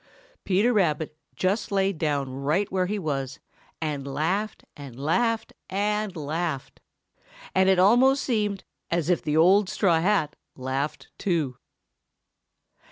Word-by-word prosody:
Peter 205 +6 +3
Rabbit 160 -7 +1 0.2
just 195 +4 0
lay 195 0 +2
down 145 -4 -1
right 150 +9 0
where 185 -1 +1
he 210 +2 -2
was 140 -7 -3 0.4
and 145 -3 -3
laughed 185 +9 -1
and 135 -4 -10
laughed 225 - 0 0.2
and 210 0 -1
laughed. 155 -2 -3 0.7
And 190 0 +4
it 190 - +4
almost 245 +9 +5
seemed 210 -5 -1 0.3
as 170 0 +1
if 175 - +2
the 155 -2 0
old 185 +4 +5
straw 170 -5 +2
hat 180 -5 +1 0.2
laughed 135 +3 -3
too. 155 -9 -1
180 Hz, 125 wpm, -26 LUFS, 150-205 Hz, 0.7 s, almost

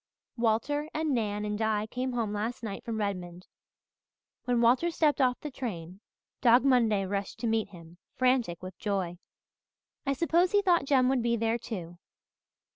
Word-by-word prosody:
"Walter 245 +6 0
and 310 -2 0
Nan 210 -3 -1
and 210 0 -3
Di 215 -1 +1
came 250 +3 -3
home 225 -4 -1
last 220 +4 -3
night 200 -3 -5
from 230 -2 -4
Redmond. 180 -4 -4 1.0
When 245 -1 +1
Walter 245 +8 +4
stepped 310 -3 +2
off 250 -1 +2
the 300 - -6
train 185 -9 -6 0.4
Dog 245 +2 +5
Monday 225 -7 +3
rushed 200 0 -3
to - - -2
meet 225 -1 +1
him, 170 -1 -14 0.2
frantic 250 -10 +1
with 185 -1 -7
joy. 185 -4 -2 0.8
I 275 - 0
suppose 340 +5 +2
he 410 0 +4
thought 345 -7 +3
Jem 265 -2 +3
would 265 -2 +2
be 235 0 +1
there, 230 +1 0
too. 175 -7 -7
230 Hz, 165 wpm, -29 LUFS, 200-260 Hz, 1.0 s, Dog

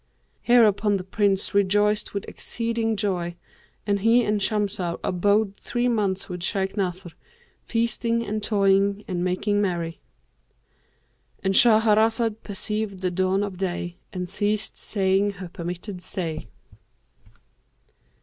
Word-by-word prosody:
Hereupon 215 -4 +4
the 185 - -6
Prince 195 0 +1
rejoiced 205 +1 +2
with 200 - -3
exceeding 230 -1 -2
joy, 180 -4 -1 0.5
and 200 -1 +1
he 230 +4 +4
and 210 -1 0
Shamsah 195 -4 -1
abode 200 +2 +1
three 240 +3 -2
months 200 -5 0
with 180 -1 -6
Shaykh 195 +2 -1
Nasr, 185 -3 -3 0.5
feasting 230 0 0
and 215 +1 -3
toying 200 -1 +2
and 180 -2 -2
making 205 +3 0
merry."— 170 -4 -2 1.4
And 195 0 +1
Shahrazad 220 0 +4
perceived 210 -1 -4
the 180 -1 0
dawn 190 +2 +1
of 195 -3 -5
day 175 -2 -3
and 180 -1 -4
ceased 205 +3 -1
saying 195 0 +1
her 185 -2 -8
permitted 180 +3 -6
say. 160 -8 -4
200 Hz, 120 wpm, -24 LUFS, 185-215 Hz, 1.4 s, Hereupon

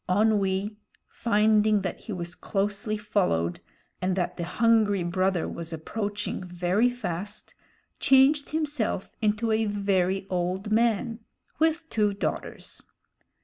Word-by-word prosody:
Onwee, 205 0 +1 0.3
finding 215 -2 +2
that 180 - -3
he 220 - -9
was 175 -3 -4
closely 205 +2 -2
followed 180 - 0 0.4
and 185 0 +1
that 180 -1 -1
the 170 - -4
hungry 215 -1 +3
brother 185 0 0
was 170 0 -6
approaching 205 +6 -4
very 180 +6 +1
fast, 205 -4 -5 0.5
changed 275 +2 +4
himself 295 -11 -1
into 215 +1 +1
a 220 0 +2
very 195 -2 0
old 185 +3 -2
man, 230 0 +1 0.4
with 320 +1 +1
two 210 -2 +1
daughters. - - -4
205 Hz, 115 wpm, -27 LUFS, 185-220 Hz, 0.5 s, changed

